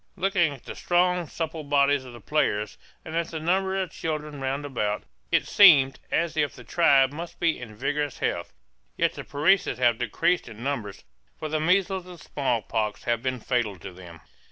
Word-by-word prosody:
Looking 185 Hz, -4 st, +1 dB
at 135 Hz, -3 st, -11 dB
the -, -, -6 dB
strong, 180 Hz, -1 st, +1 dB
supple 160 Hz, -1 st, -4 dB
bodies 140 Hz, -1 st, +2 dB
of 125 Hz, -, -10 dB
the 120 Hz, -, -10 dB
players, 105 Hz, -6 st, -1 dB, 0.3 s
and 160 Hz, -1 st, -6 dB
at 170 Hz, 0 st, 0 dB
the 160 Hz, -, -5 dB
number 190 Hz, +4 st, 0 dB
of 185 Hz, -3 st, -3 dB
children 150 Hz, -3 st, -4 dB
roundabout, 130 Hz, -6 st, -2 dB, 0.3 s
it -, -, +2 dB
seemed 140 Hz, -10 st, +6 dB
as 165 Hz, -1 st, 0 dB
if 145 Hz, -2 st, 0 dB
the 125 Hz, -, -12 dB
tribe 135 Hz, -5 st, +4 dB
must 165 Hz, +3 st, -8 dB
be 165 Hz, -2 st, +1 dB
in 115 Hz, -4 st, -9 dB
vigorous 145 Hz, +4 st, -2 dB
health; 85 Hz, -, -2 dB, 0.5 s
yet -, -, +2 dB
the -, -, -7 dB
Parecis 155 Hz, -, +2 dB
have 120 Hz, -3 st, +2 dB
decreased 125 Hz, -, 0 dB
in 115 Hz, +1 st, -10 dB
numbers, 115 Hz, -8 st, -4 dB, 0.3 s
for 155 Hz, -, -5 dB
measles 185 Hz, +2 st, +1 dB
and 180 Hz, -2 st, -11 dB
smallpox 115 Hz, -7 st, -2 dB
have 120 Hz, -1 st, 0 dB
been 130 Hz, 0 st, -2 dB
fatal 115 Hz, -5 st, -1 dB
to 90 Hz, +2 st, -9 dB
them. 85 Hz, -3 st, -12 dB
145 Hz, 180 wpm, -26 LUFS, 120-170 Hz, 0.5 s, seemed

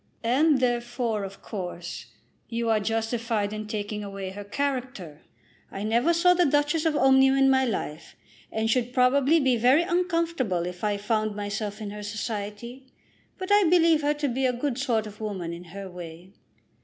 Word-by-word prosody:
"And 275 Hz, +5 st, +3 dB
therefore, 240 Hz, -3 st, -1 dB
of 195 Hz, 0 st, -9 dB
course, 175 Hz, -3 st, -6 dB, 0.4 s
you 230 Hz, -1 st, -1 dB
are 220 Hz, -, +3 dB
justified 225 Hz, 0 st, -1 dB
in 215 Hz, 0 st, -5 dB
taking 210 Hz, 0 st, -4 dB
away 195 Hz, -1 st, -6 dB
her 205 Hz, +2 st, -7 dB
character. 245 Hz, -, -4 dB, 0.5 s
I 195 Hz, -, -5 dB
never 235 Hz, +9 st, +2 dB
saw 350 Hz, +2 st, +4 dB
the 355 Hz, 0 st, +3 dB
Duchess 295 Hz, +3 st, +1 dB
of 310 Hz, -, 0 dB
Omnium 265 Hz, 0 st, +5 dB
in 270 Hz, 0 st, +5 dB
my 265 Hz, 0 st, +3 dB
life, 165 Hz, -9 st, -4 dB, 0.4 s
and 220 Hz, 0 st, -1 dB
should 245 Hz, +1 st, 0 dB
probably 270 Hz, +5 st, +4 dB
be 260 Hz, -4 st, +2 dB
very 255 Hz, +8 st, +4 dB
uncomfortable 335 Hz, -, 0 dB
if 180 Hz, +1 st, -7 dB
I 205 Hz, -1 st, +1 dB
found 215 Hz, 0 st, -1 dB
myself 205 Hz, +1 st, -4 dB
in 205 Hz, -1 st, -5 dB
her 210 Hz, 0 st, -7 dB
society; 215 Hz, +4 st, -5 dB, 0.5 s
but 375 Hz, +1 st, -5 dB
I 410 Hz, -1 st, +6 dB
believe 330 Hz, -2 st, +4 dB
her 295 Hz, +1 st, +1 dB
to 295 Hz, -1 st, -1 dB
be 260 Hz, +1 st, 0 dB
a 250 Hz, -, 0 dB
good 250 Hz, +1 st, -2 dB
sort 235 Hz, -5 st, 0 dB
of 210 Hz, 0 st, -11 dB
woman 190 Hz, -6 st, -4 dB
in 175 Hz, +1 st, -9 dB
her 195 Hz, +3 st, -8 dB
way." 175 Hz, +1 st, -10 dB
230 Hz, 175 wpm, -26 LUFS, 205-270 Hz, 0.5 s, I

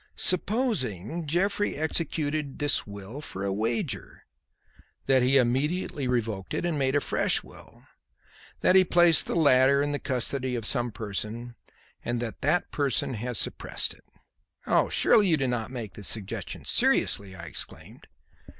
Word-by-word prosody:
Supposing 170 Hz, -, +1 dB
Jeffrey 200 Hz, +6 st, 0 dB
executed 155 Hz, -2 st, -2 dB
this 145 Hz, -6 st, +2 dB
will 100 Hz, +7 st, -9 dB
for 100 Hz, -9 st, -6 dB
a 100 Hz, -, -1 dB
wager; 110 Hz, +3 st, -3 dB, 0.8 s
that 135 Hz, -1 st, +3 dB
he 130 Hz, +2 st, +4 dB
immediately 135 Hz, +3 st, 0 dB
revoked 110 Hz, -6 st, -2 dB
it -, -, -2 dB
and 165 Hz, -4 st, -1 dB
made 135 Hz, 0 st, 0 dB
a -, -, +4 dB
fresh -, -, +1 dB
will, -, -, -16 dB, 0.8 s
that 185 Hz, -, +4 dB
he 190 Hz, -, +7 dB
placed 175 Hz, -3 st, +4 dB
the -, -, -2 dB
latter 140 Hz, -3 st, +4 dB
in 145 Hz, +1 st, 0 dB
the 145 Hz, -, -2 dB
custody 130 Hz, 0 st, -1 dB
of 115 Hz, -3 st, -4 dB
some 120 Hz, -1 st, +2 dB
person 110 Hz, +3 st, -5 dB, 0.5 s
and 120 Hz, 0 st, -2 dB
that 115 Hz, -2 st, -6 dB
that 155 Hz, +6 st, 0 dB
person 140 Hz, -3 st, -1 dB
has 120 Hz, +1 st, -3 dB
suppressed -, -, 0 dB
it." -, -, -22 dB, 0.9 s
"Surely 210 Hz, -2 st, +4 dB
you 165 Hz, -3 st, +3 dB
do 135 Hz, -2 st, -1 dB
not 120 Hz, -3 st, -2 dB
make 120 Hz, -7 st, -7 dB
this 100 Hz, -, -6 dB
suggestion 105 Hz, -4 st, -4 dB
seriously!" 95 Hz, -2 st, +2 dB
I 85 Hz, -, -10 dB
exclaimed. 80 Hz, -, -8 dB
130 Hz, 150 wpm, -27 LUFS, 115-155 Hz, 0.9 s, he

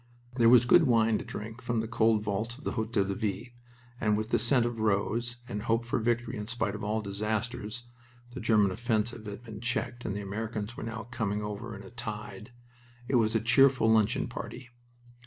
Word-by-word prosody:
There 115 Hz, -2 st, +6 dB
was 120 Hz, -1 st, +7 dB
good 160 Hz, +5 st, +6 dB
wine 115 Hz, -2 st, +3 dB
to -, -, -5 dB
drink 110 Hz, +3 st, -7 dB
from 120 Hz, -2 st, -1 dB
the 110 Hz, -, -2 dB
cold 110 Hz, -1 st, +2 dB
vaults 110 Hz, +4 st, -2 dB
of 145 Hz, -, -14 dB
the -, -, -2 dB
Hotel 110 Hz, -2 st, 0 dB
de 100 Hz, 0 st, -2 dB
Ville, 105 Hz, +1 st, -2 dB, 0.5 s
and 105 Hz, -2 st, +2 dB
with 110 Hz, +1 st, -3 dB
the 120 Hz, -, +2 dB
scent 120 Hz, +2 st, +3 dB
of 120 Hz, -1 st, -3 dB
rose 110 Hz, +3 st, 0 dB
and 105 Hz, -3 st, -4 dB
hope 115 Hz, +2 st, 0 dB
for 120 Hz, -, 0 dB
victory 120 Hz, +1 st, 0 dB
in 105 Hz, 0 st, -5 dB
spite 110 Hz, -5 st, -1 dB
of 105 Hz, -, -6 dB
all 110 Hz, +1 st, -1 dB
disasters 110 Hz, +3 st, -3 dB, 0.5 s
the 130 Hz, -, -7 dB
German 110 Hz, -4 st, +3 dB
offensive 110 Hz, +1 st, -1 dB
had 105 Hz, +3 st, -7 dB
been 110 Hz, -3 st, -9 dB
checked 120 Hz, 0 st, -2 dB
and 100 Hz, -, -3 dB
the 105 Hz, -, -3 dB
Americans 110 Hz, +2 st, -4 dB
were -, -, -7 dB
now 115 Hz, 0 st, -5 dB
coming 105 Hz, -3 st, -1 dB
over 105 Hz, +2 st, -5 dB
in 100 Hz, -, -9 dB
a 95 Hz, -, -12 dB
tide 105 Hz, -2 st, -6 dB, 0.6 s
it 130 Hz, -, +3 dB
was 110 Hz, -1 st, +2 dB
a -, -, +4 dB
cheerful 125 Hz, 0 st, +5 dB
luncheon 110 Hz, +2 st, +3 dB
party. 120 Hz, +1 st, -7 dB
110 Hz, 205 wpm, -29 LUFS, 105-120 Hz, 0.6 s, was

